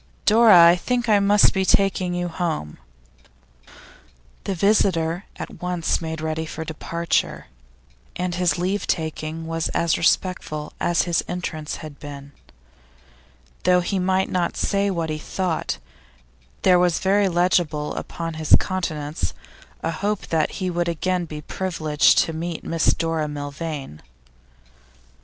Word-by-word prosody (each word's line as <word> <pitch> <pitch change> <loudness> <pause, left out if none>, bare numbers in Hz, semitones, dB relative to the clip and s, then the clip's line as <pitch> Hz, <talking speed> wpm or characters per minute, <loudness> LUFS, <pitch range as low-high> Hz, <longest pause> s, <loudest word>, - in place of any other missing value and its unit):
'Dora, 215 -5 +7
I 170 - +5
think 245 +5 -1
I 210 -2 +5
must 200 +1 +5
be 190 - +1
taking 185 -1 +2
you 175 0 -1
home.' 160 - -3 1.7
The 195 - -2
visitor 180 -3 +2
at - - -8
once 180 -2 -1
made 160 -1 -4
ready 160 0 -2
for 160 +1 -6
departure, 170 +1 -2 0.7
and 180 0 -2
his 175 -3 +1
leave 185 +3 -1
taking 160 0 -3
was 165 0 -2
as 165 -1 +1
respectful 165 -3 0
as 175 - +2
his 175 -1 0
entrance 160 -4 -4
had 145 -2 -11
been. 140 -1 -9 1.3
Though 180 0 +4
he 190 +2 -1
might 190 +1 +1
not 175 -2 -1
say 200 0 +1
what 165 -4 -2
he 155 - -3
thought, 180 0 -2 0.9
there 180 -1 +5
was 175 -2 +2
very 195 +1 +2
legible 170 -4 +1
upon 165 -1 -5
his 155 - +6
countenance 155 - -3 0.5
a 165 - 0
hope 200 +5 -2
that 160 -2 +1
he 185 -2 -2
would 175 0 -1
again 180 +2 -1
be 150 -2 -7
privileged 155 -4 +1
to 165 - -5
meet 165 +1 -4
Miss 165 -1 +2
Dora 165 -2 -1
Milvain. 145 - -6
170 Hz, 135 wpm, -23 LUFS, 160-185 Hz, 1.7 s, Dora